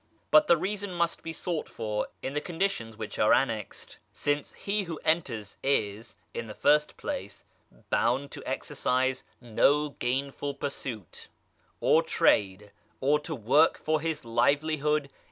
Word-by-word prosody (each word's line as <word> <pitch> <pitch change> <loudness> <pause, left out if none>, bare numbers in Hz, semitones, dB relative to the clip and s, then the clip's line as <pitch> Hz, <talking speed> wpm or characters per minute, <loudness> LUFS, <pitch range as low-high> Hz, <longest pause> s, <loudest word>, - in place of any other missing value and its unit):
But 305 0 +7
the 170 - +6
reason 200 +3 -3
must 170 -1 0
be 165 - -5
sought 165 -1 -3
for 105 -1 -3 0.2
in 135 - -3
the 150 - -1
conditions 165 - -2
which - - -6
are - - +4
annexed, - - -1
since 145 0 -1
he 200 0 -2
who 165 -2 -5
enters 120 - 0
is, 110 -5 0 0.2
in 115 - -4
the 105 - -8
first 150 +1 +3
place, - - -5 0.5
bound 130 +5 +1
to - - -7
exercise 130 +1 0 0.2
no 140 +5 +2
gainful 140 +2 -2
pursuit, 130 - -6 0.5
or - - +4
trade, 100 +1 +2 0.3
or 145 +3 +3
to 160 +1 -5
work 135 +7 +4
for 155 -1 0
his 160 -5 -3
livelihood 145 +4 +1
[p. - - -28
140 Hz, 145 wpm, -28 LUFS, 120-160 Hz, 0.5 s, But